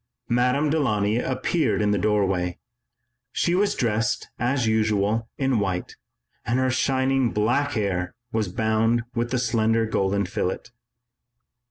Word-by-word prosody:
Madame 125 +5 +2
Delaunay 110 -8 +1
appeared 135 +6 0
in 105 -1 +2
the 105 - +2
doorway. 95 -4 0 0.8
She 170 - +1
was 200 +3 +2
dressed 115 -1 -1
as 125 0 +1
usual 110 0 +1
in 130 -4 +1
white 95 -3 -2 0.5
and 120 - 0
her 130 0 +1
shining 130 -1 +1
black 130 +7 +1
hair 95 -5 -2 0.2
was 110 -2 0
bound 110 +4 +1
with 120 0 -1
the 125 - 0
slender 115 -2 +1
gold 100 -2 0
fillet. 90 -1 -2
115 Hz, 130 wpm, -24 LUFS, 105-130 Hz, 0.8 s, Madame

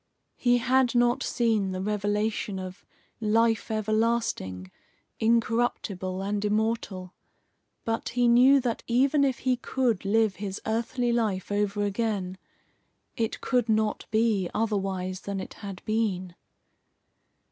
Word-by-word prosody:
He 245 -1 +3
had 255 +1 +2
not 240 0 +3
seen 220 -6 0
the 185 - -3
revelation 205 0 -1
of 185 +1 -7 0.4
"life 225 0 +2
everlasting, 215 - -1 0.5
incorruptible 220 -5 0
and 205 +1 -2
immortal." 210 -3 -1 0.7
But 225 0 -2
he 245 0 +2
knew 255 +4 +6
that 240 -2 -2
even 270 +4 +3
if 265 -3 +1
he 255 -1 0
could 240 -5 0
live 215 0 +2
his 195 -1 -4
earthly 235 +2 0
life 210 -5 -1
over 205 0 0
again, 200 -3 -2 0.8
it 225 -1 -2
could 245 -3 +1
not 215 -1 0
be 215 -5 +1
otherwise 195 -4 -1
than 200 -1 -4
it - - -7
had 195 -3 -8
been. 200 -5 -1
215 Hz, 120 wpm, -27 LUFS, 195-235 Hz, 0.8 s, knew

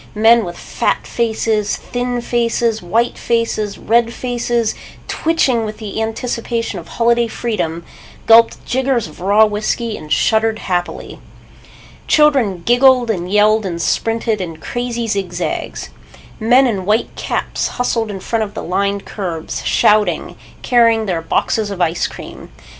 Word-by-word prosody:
Men 225 +2 +5
with 175 0 -7
fat - - -2
faces, 220 -2 0
thin 245 0 -3
faces, 235 -2 0
white 225 +7 0
faces, 230 -3 -1
red 230 +1 +2
faces, 240 -2 -1 0.3
twitching 275 -8 +1
with 215 0 -5
the 215 0 -5
anticipation 230 -1 -3
of 170 - -11
holiday 235 0 +2
freedom, 175 -8 -3 0.4
gulped 230 0 +5
jiggers 260 -2 0
of 155 - -14
raw 205 +4 +5
whiskey 215 +2 -2
and 155 0 -11
shuddered 220 0 +2
happily. 180 -4 -3 0.9
Children 260 - +3
giggled 245 0 +4
and 180 -3 -4
yelled 215 +1 +4
and 175 -3 -4
sprinted 225 +2 0
in 165 -3 -5
crazy 240 +6 -3
zig 195 -5 -2
zags. 175 - -4 0.5
Men 245 +4 +4
in 200 -7 -1
white 215 +3 +1
caps - - -2
hustled 230 -3 0
in 195 -2 -5
front 230 +3 -1
of 210 -2 -4
the - - -5
lined 200 +2 -1
curbs, 170 -6 -5
shouting, 210 0 +2 0.3
carrying 230 -2 +3
their 175 -5 -1
boxes 210 +5 0
of 200 -2 -6
ice 170 -1 +1
cream. - - -10
220 Hz, 140 wpm, -17 LUFS, 200-235 Hz, 0.9 s, Men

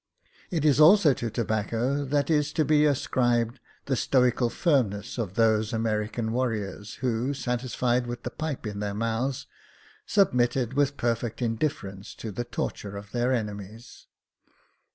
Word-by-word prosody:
It 160 -4 -1
is 145 -2 +4
also 160 -1 +7
to 120 -2 -3
tobacco 115 +5 -1
that 145 +3 0
is 150 -1 +2
to 155 -2 +2
be 150 0 +4
ascribed 120 -4 +1 0.3
the 135 - 0
stoical 125 -1 +2
firm 140 - +2
ness 105 +4 -7
of 100 -5 -3
those 110 -1 +2
American 110 0 -1
warriors, 110 -4 -2
who, 125 +3 0
satisfied 125 -1 -1
with 120 0 -6
the - - -4
pipe 155 -6 -4
in 105 -1 -4
their 100 -1 -3
mouths, 115 +4 -1 0.6
submitted 125 - +2
with 140 0 +1
perfect 115 -1 -1
indifference 115 -5 -3
to 110 - -6
the 120 +5 -4
torture 100 -4 -4
of 100 0 -10
their 120 +1 +1
enemies. 105 -1 -5
120 Hz, 145 wpm, -27 LUFS, 110-135 Hz, 0.6 s, also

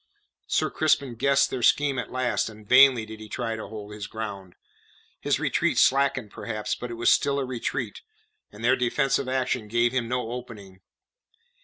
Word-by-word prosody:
Sir - - 0
Crispin 140 -5 +1
guessed 140 +4 +2
their 130 - -3
scheme 140 +2 +3
at - - -5
last, 130 -3 0
and 105 -1 -14
vainly 130 -2 +6
did 110 0 -10
he 110 0 -10
try 115 0 -3
to 110 - -7
hold 105 -1 -9
his 105 -1 -6
ground; 100 -5 -7 0.6
his - - 0
retreat - - 0
slackened 135 -5 +2
perhaps, 110 -2 -4
but 125 - -6
it 120 - -5
was 115 - +4
still 140 -1 +1
a 140 - -1
retreat, 125 -2 -4 0.5
and 110 +3 -7
their 130 +2 +5
defensive 130 +2 0
action 130 -3 -1
gave 120 +2 +2
him 125 -2 -1
no 125 -1 -2
opening. 105 -6 -9
120 Hz, 175 wpm, -25 LUFS, 110-130 Hz, 0.6 s, vainly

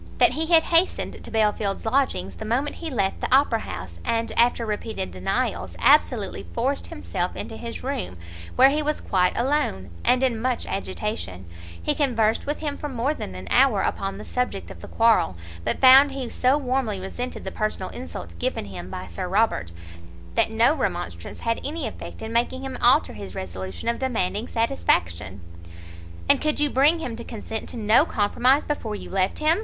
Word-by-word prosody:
That - - +5
he 320 +1 -2
had 330 -1 +6
hastened 340 +2 +1
to - - -9
Belfield's 210 -2 0
lodgings 220 - 0
the - - -6
moment 250 +7 -1
he 330 - -5
left 200 -8 -1
the - - -2
Opera 260 -3 +4
house, 90 - -7
and, 230 0 0
after 235 0 +2
repeated 210 - -3
denials, 90 +1 -2
absolutely - - +3
forced 85 - 0
himself 85 -1 -3
into - - -6
his - - -6
room, 90 0 -3 0.4
where 265 +2 +7
he 300 +2 +1
was 300 0 -1
quite 180 -2 +1
alone, 235 - 0
and 255 +1 +3
in 235 -4 +1
much 250 0 0
agitation: 195 - -4 0.3
he 85 - 0
conversed 230 -6 +1
with 295 - -2
him 290 -2 -2
for 295 - -4
more 260 +3 0
than 95 - -7
an 90 0 -7
hour 250 -6 +5
upon 195 0 -2
the 210 - -8
subject 250 -6 -3
of - - -11
the - - -9
quarrel, 225 - +3 0.3
but - - 0
found 270 +2 +8
he 270 -2 -4
so 255 +3 +3
warmly 255 -7 -1
resented 245 +7 -5
the - - -5
personal 215 -3 -2
insult 85 0 -7
given - - -1
him 90 -2 -8
by 90 0 -6
Sir 90 - -5
Robert, 195 - +1 0.6
that - - +2
no 225 +5 +4
remonstrance 175 - -4
had 230 0 -1
any 300 -3 -3
effect 220 - -8
in 220 +1 -5
making 245 +3 0
him 265 -1 -5
alter 240 - +4
his 100 -3 -8
resolution 95 - -6
of 235 - 0
demanding 225 -3 -1
satisfaction. 95 - 0 0.9
"And - - +4
could 305 -1 +1
you 295 -1 +2
bring 290 +6 +4
him 250 -8 -4
to 235 - -7
consent 220 -1 -6
to - - -5
no 215 +1 +5
compromise 245 +7 +2
before 230 -8 -3
you - - -8
left 190 0 +1
him?" 310 +4 +3
225 Hz, 185 wpm, -24 LUFS, 180-265 Hz, 0.9 s, found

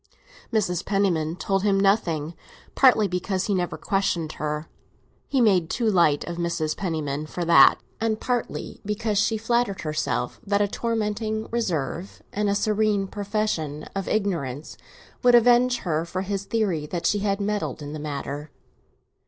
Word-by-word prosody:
Mrs. 185 -6 0
Penniman 175 -6 0
told 195 +1 0
him 200 -1 +2
nothing, 170 -6 +1 0.4
partly 245 -6 +5
because 185 +1 -2
he 205 - 0
never 180 -2 -1
questioned 180 -6 -1
her—he 150 - -6
made 190 -8 +3
too 235 -2 0
light 170 -8 +3
of 170 0 -6
Mrs. 170 -3 -1
Penniman 155 -5 -3
for 175 +2 -4
that—and 170 - +4
partly 245 -2 -3
because 210 0 -1
she 215 +1 +2
flattered 225 -2 0
herself 155 -1 -2
that 200 -2 +1
a 205 - +3
tormenting 220 0 -2
reserve, 180 - -3
and 210 0 0
a 200 - +1
serene 210 -1 +1
profession 200 -8 -2
of 195 -1 -3
ignorance, 165 -10 -2 0.5
would 245 -1 +6
avenge 245 +1 +5
her 160 -3 0
for 185 +2 -4
his 195 0 -3
theory 190 -10 -1
that 170 +2 -4
she 205 - +2
had 200 0 0
meddled 205 -6 -2
in 145 +1 -6
the 155 - -5
matter. 145 0 -5
195 Hz, 145 wpm, -25 LUFS, 160-215 Hz, 0.5 s, would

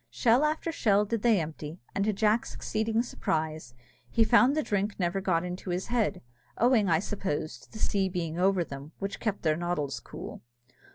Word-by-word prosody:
Shell 230 - +3
after 310 +2 0
shell 210 -8 +3
did 230 +1 -2
they 225 -4 +4
empty, 155 0 -6
and 200 - 0
to 215 - +3
Jack's 215 +3 +1
exceeding 220 +1 0
surprise, 155 - -3 0.3
he 225 - +4
found 245 +5 +5
the 310 - +2
drink 205 -2 -1
never 180 +2 0
got 180 -3 +1
into 180 +1 -5
his 180 +1 -1
head, 235 - 0 0.3
owing, 235 -4 +4
I 165 - +5
suppose, 170 -4 -3
to - - -19
the - - -9
sea 195 -3 +1
being 170 -2 -3
over 190 -1 +3
them, 140 0 -9
which 195 0 -4
kept 215 -3 -2
their 155 -2 +3
noddles 150 -7 -2
cool. - - -9
195 Hz, 185 wpm, -29 LUFS, 165-220 Hz, 0.3 s, found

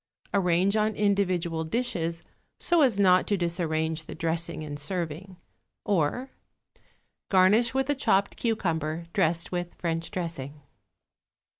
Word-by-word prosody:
Arrange 185 +1 +2
on 215 0 +1
individual 185 -5 0
dishes, 165 -4 -2 0.4
so 345 -2 +3
as 250 -8 +4
not 185 -2 +5
to 205 - +1
disarrange 160 -2 -1
the - - -7
dressing 165 0 -2
in 145 -1 -6
serving. 170 +4 -4 0.5
Or, 205 - 0 1.0
garnish 205 +6 +4
with 265 0 +1
a 290 - +2
chopped 200 -7 +1
cucumber 170 -8 -1
dressed 170 -3 +1
with 175 -1 -4
French 165 -1 -3
dressing. 150 -5 -5
175 Hz, 120 wpm, -27 LUFS, 160-200 Hz, 1.0 s, not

